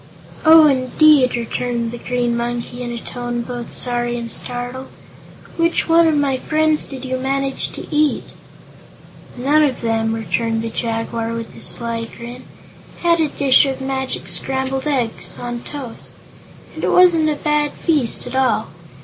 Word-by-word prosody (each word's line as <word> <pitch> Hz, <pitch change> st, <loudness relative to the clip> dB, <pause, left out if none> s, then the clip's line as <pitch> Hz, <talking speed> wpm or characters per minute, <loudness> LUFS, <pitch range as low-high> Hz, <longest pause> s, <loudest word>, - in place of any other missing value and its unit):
"Oh, 320 Hz, 0 st, +9 dB
indeed!" 270 Hz, 0 st, +4 dB
returned 235 Hz, 0 st, -2 dB
the 240 Hz, -, -7 dB
Green 245 Hz, -1 st, -1 dB
Monkey, 240 Hz, +1 st, -4 dB
in 240 Hz, -1 st, -4 dB
a 240 Hz, -, -4 dB
tone 240 Hz, 0 st, -4 dB
both 240 Hz, 0 st, -6 dB
sorry 240 Hz, -1 st, -1 dB
and 235 Hz, -1 st, -5 dB
startled. 245 Hz, +2 st, -4 dB, 0.7 s
"Which 335 Hz, 0 st, +1 dB
of 330 Hz, -1 st, +4 dB
my 280 Hz, -2 st, +1 dB
friends 310 Hz, +1 st, +1 dB
did 270 Hz, -1 st, -7 dB
you 260 Hz, 0 st, -2 dB
manage 270 Hz, +1 st, -2 dB
to -, -, -7 dB
eat?" 300 Hz, 0 st, +1 dB, 1.0 s
"None 285 Hz, +5 st, +3 dB
of 275 Hz, -4 st, 0 dB
them," 225 Hz, -1 st, 0 dB
returned 225 Hz, 0 st, -1 dB
the 230 Hz, -, -3 dB
Jaguar, 225 Hz, 0 st, -3 dB
with 230 Hz, -1 st, -6 dB
a -, -, -10 dB
sly 230 Hz, -1 st, 0 dB
grin 240 Hz, +2 st, -9 dB, 0.6 s
"I -, -, 0 dB
had 335 Hz, 0 st, +4 dB
a 315 Hz, -, +3 dB
dish 280 Hz, -1 st, +4 dB
of 265 Hz, -1 st, -3 dB
magic 265 Hz, 0 st, -3 dB
scrambled 265 Hz, +1 st, -1 dB
eggs 250 Hz, -6 st, -1 dB
on 240 Hz, 0 st, -5 dB
toast 270 Hz, -5 st, -8 dB, 0.6 s
and -, -, -8 dB
it -, -, +2 dB
wasn't 340 Hz, -4 st, +5 dB
a 300 Hz, -, 0 dB
bad 300 Hz, 0 st, 0 dB
feast, 295 Hz, -9 st, 0 dB
at 245 Hz, -, -7 dB
all. 250 Hz, -5 st, +1 dB
255 Hz, 160 wpm, -19 LUFS, 235-290 Hz, 1.0 s, Oh